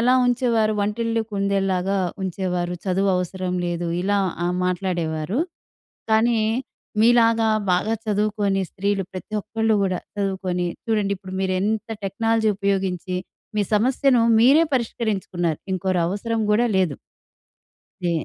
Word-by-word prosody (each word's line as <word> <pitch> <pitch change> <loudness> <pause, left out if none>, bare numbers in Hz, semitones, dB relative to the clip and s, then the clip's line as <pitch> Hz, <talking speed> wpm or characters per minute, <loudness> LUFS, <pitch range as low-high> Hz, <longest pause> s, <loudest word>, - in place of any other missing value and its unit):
ఎలా 250 +2 +4
ఉంచేవారు? 235 -3 +2
వంటిల్లు 225 +2 0
కుందేల్లాగా 195 -1 0 0.3
ఉంచేవారు. 180 -1 -2
చదువవసరం 185 -1 0
లేదు, 175 0 -2 0.2
ఇలా 200 +1 +1 0.3
ఆహ్, 175 - 0
మాట్లాడేవారు, 175 - -1 0.7
కానీ 225 +1 +4 0.6
మీలాగా 230 -1 +4 0.2
బాగా 215 +5 +1
చదువుకొని, 205 -2 +1
స్త్రీలు 200 0 -1
ప్రతి 190 +3 -7
ఒక్కళ్ళు 225 +1 0
గూడా 185 -2 0 0.2
చదువుకొని 190 -3 -1 0.2
చూడండిప్పుడు 200 -4 -1
మీరెంత 200 +4 -1
టెక్నాలజీ 220 +3 +1
ఉపయోగించి, 190 -2 -1 0.4
మీ 205 - +3
సమస్యను 250 +2 +3 0.2
మీరే 280 +8 +6
పరిష్కరించుకున్నారు. 195 - -1
ఇంకోరవసరం 190 +5 0
గూడా 235 +3 +3
లేదు. 180 -7 +2 1.1
నే 175 - +2
200 Hz, 100 wpm, -23 LUFS, 185-225 Hz, 1.1 s, మీరే